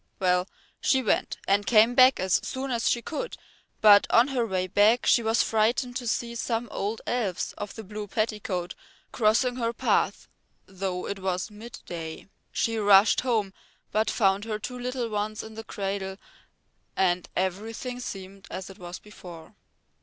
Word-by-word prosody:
Well, 180 0 +2 0.3
she 265 -1 +2
went 215 - 0
and 200 +1 +3
came 225 +2 +5
back 255 +1 +6
as 185 0 +2
soon 265 0 -4
as 235 -1 +1
she 235 - 0
could, 485 +10 -5 0.4
but 205 -1 +7
on 240 +4 +5
her 245 -4 0
way 185 -2 -1
back 210 +6 +3
she 235 - +5
was 225 0 +2
frightened 235 +3 +1
to 245 - -5
see 235 +1 -1
some 235 0 -2
old 210 +3 -3
elves 215 -8 -2
of 205 - -6
the 220 - -7
blue 210 +1 -7
petticoat 205 -4 -2 0.4
crossing 245 +3 +2
her 230 -1 -1
path - - 0 0.4
though 190 -1 -4
it 200 - -4
was 185 +2 -2
midday. 175 -8 -8 0.2
She 225 -1 0
rushed 200 0 +6
home, 220 -6 0 0.4
but 215 +1 +1
found 195 -1 +2
her 215 -2 -2
two 250 +4 -6
little 250 -1 -2
ones 215 0 -3
in 220 - -10
the 225 +1 -7
cradle 195 -2 -4 0.8
and 180 -2 +1
everything 220 +7 -3
seemed 195 -4 -8
as 190 +1 -6
it 195 - -15
was 175 0 -7
before. 180 -6 -12
215 Hz, 160 wpm, -27 LUFS, 190-235 Hz, 0.8 s, but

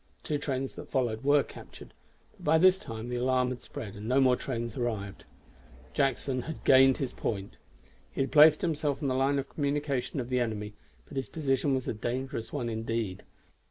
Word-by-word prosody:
Two 150 -1 -1
trains 135 -2 -2
that - - -10
followed 120 -3 -1
were 145 0 +4
captured; - - -12 0.4
but - - -19
by 160 +2 +4
this 185 +3 +5
time 115 -4 -7
the 125 - -2
alarm 125 0 +2
had 125 -1 -5
spread, 105 -1 -7
and 105 +1 -7
no 130 +2 +4
more 130 -2 +5
trains 120 -3 -4
arrived. 110 -6 -3 0.7
Jackson 135 -2 0
had 160 +5 -7
gained 135 0 +6
his 135 -3 -3
point. 100 -3 -4 0.6
He - - -2
had 135 - -1
placed 150 0 +7
himself 150 -4 -1
on 140 - +1
the - - +1
line 135 +2 +2
of 135 0 -2
communication 145 -2 -2
of 125 -1 -4
the 125 -1 +1
enemy, 105 -3 -2 0.3
but 140 - -10
his 135 - -2
position 135 -3 0
was 130 - -3
a - - 0
dangerous 120 +1 -4
one 130 -5 -2
indeed. 115 -3 -3
130 Hz, 195 wpm, -29 LUFS, 115-140 Hz, 0.7 s, placed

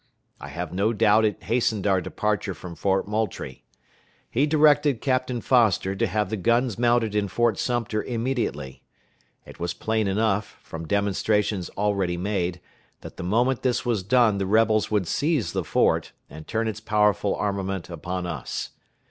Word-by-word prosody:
I - - -8
have 85 0 -6
no 100 +5 +1
doubt 110 0 +4
it 105 - -2
hastened 115 -4 0
our 95 -2 +3
departure 100 +1 -2
from 90 -2 -9
Fort 95 +3 0
Moultrie. 105 -11 -3 0.7
He 140 +6 +2
directed 145 -4 +4
Captain 130 -2 -1
Foster 110 -7 +2
to - - 0
have 105 -3 -1
the 110 - -1
guns 115 +3 +1
mounted 120 -3 +2
in 105 -1 0
Fort 115 0 +1
Sumter 115 -3 -1
immediately. 115 - -3 0.6
It - - -13
was 85 0 -3
plain 110 -1 -1
enough, 105 +1 0
from 80 0 -8
demonstrations 100 -1 0
already 100 -4 0
made, 90 -2 -2 0.4
that - - -11
the - - -5
moment 120 +7 +1
this 130 0 0
was 115 -5 0
done 110 0 +3
the 95 - -1
rebels 110 +1 +3
would 105 -5 0
seize 140 - 0
the - - -1
fort, - - +1 0.2
and 80 +2 -10
turn 110 +1 -1
its 110 -1 -3
powerful 105 -2 +2
armament 95 -2 -2
upon 90 +2 -5
us. 85 - -5
105 Hz, 160 wpm, -25 LUFS, 95-115 Hz, 0.7 s, doubt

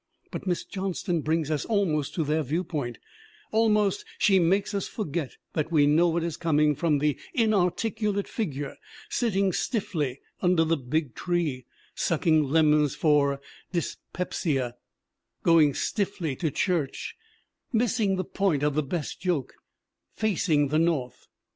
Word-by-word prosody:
But - - -6
Miss 175 -1 0
Johnston 185 -3 -2
brings 155 0 0
us 150 - 0
almost 175 -10 0
to 165 - +1
their 155 +2 +1
viewpoint; 150 -5 -2 0.5
almost 210 -3 +2
she 195 -2 +4
makes 195 +5 +2
us 200 -2 -1
forget 160 - -4 0.2
that 155 +1 -1
we 150 -3 +5
know 155 +4 +4
what 165 0 0
is 170 -2 -3
coming 150 -2 +3
from 150 +1 +1
the 150 0 0 0.2
inar 215 -6 +4
ticulate 210 0 -2
figure 145 - -4 0.3
sitting 195 -5 +1
stiffly 170 - -1 0.2
under 180 -3 +4
the 165 +1 +2
big 140 -1 -2
tree, 155 -8 -2 0.3
sucking 160 -2 +2
lemons 150 -1 +3
for 145 -3 +3 0.3
dyspepsia, 155 -6 -2 0.7
going 160 -4 +5
stiffly 195 -8 -1
to 160 +1 -1
church, 165 -3 -1 0.6
missing 220 -4 +2
the 185 -1 -2
point 175 -8 0
of 150 -1 +2
the 155 - +2
best 150 +2 -4
joke, 175 -8 -1 0.6
facing 165 -9 +1
the 155 +2 +2
North. 160 -7 -1
165 Hz, 135 wpm, -27 LUFS, 150-190 Hz, 0.7 s, we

